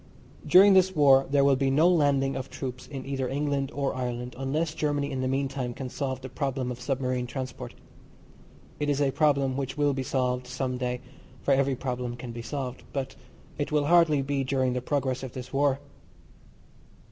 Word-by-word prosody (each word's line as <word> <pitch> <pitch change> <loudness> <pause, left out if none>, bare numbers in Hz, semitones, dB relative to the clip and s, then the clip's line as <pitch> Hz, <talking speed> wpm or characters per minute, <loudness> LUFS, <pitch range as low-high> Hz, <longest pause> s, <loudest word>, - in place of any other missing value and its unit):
During 195 +2 +8
this 190 0 +4
war 135 -2 +5
there 140 0 +3
will 140 -1 +5
be 135 0 +1
no 150 +5 +4
landing 140 -6 +2
of 130 0 -5
troops 130 -1 -6
in 135 -3 -7
either 135 -2 -2
England 140 -1 -1
or 140 -1 -1
Ireland 125 -1 -4
unless 150 +5 -1
Germany 145 -2 -1
in 130 -1 -2
the 130 - 0
meantime 135 -2 -2
can 130 -2 -5
solve 130 -1 -3
the 130 - -6
problem 130 -1 -2
of 125 0 -7
submarine 130 -2 -1
transport. 125 -1 -6 1.0
It 145 - 0
is 145 -1 +1
a 140 -2 +2
problem 140 -3 +2
which 135 +1 -3
will 145 -1 +2
be 135 - -2
solved 125 -1 -1
some 125 0 -3
day, 125 -1 -2 0.4
for 140 - +3
every 135 0 +2
problem 125 -1 -3
can 120 0 -7
be 115 0 -6
solved, 130 0 -5
but 135 -2 -3 0.4
it 145 - -2
will 150 -1 +2
hardly 165 -3 +4
be 140 0 -1
during 130 -1 0
the 125 - -2
progress 130 -1 -1
of 130 -3 -7
this 125 0 -8
war. 140 -1 +2
135 Hz, 190 wpm, -27 LUFS, 130-145 Hz, 1.0 s, During